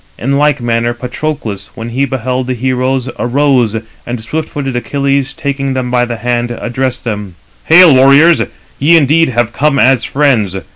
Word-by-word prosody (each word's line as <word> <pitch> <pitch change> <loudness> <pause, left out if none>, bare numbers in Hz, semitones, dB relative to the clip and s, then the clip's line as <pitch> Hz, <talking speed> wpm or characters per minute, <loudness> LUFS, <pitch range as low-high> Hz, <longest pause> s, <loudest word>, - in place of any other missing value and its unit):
In 140 +3 -1
like 150 -1 +2
manner 120 0 -1
Patroclus, 120 -5 -5
when 115 -1 -6
he 130 +4 0
beheld 130 -1 -3
the 130 - -2
heroes, 130 +1 -1
arose, 125 -3 +1 0.3
and 120 0 -5
swift 155 +8 -4
footed 135 -3 -4
Achilles 140 +2 -1
taking 135 -1 -3
them 125 -1 -3
by 125 -1 +2
the 120 -1 -5
hand, 120 0 -1
addressed 120 +2 -3
them: 105 -5 -5 0.3
"Hail, 165 -1 +7
warriors, 140 +6 +5 0.4
ye 165 +5 +5
indeed 160 +2 +3
have 120 -1 -1
come 150 0 +1
as 130 -2 +3
friends. 120 -7 +1
130 Hz, 160 wpm, -12 LUFS, 120-140 Hz, 0.4 s, Hail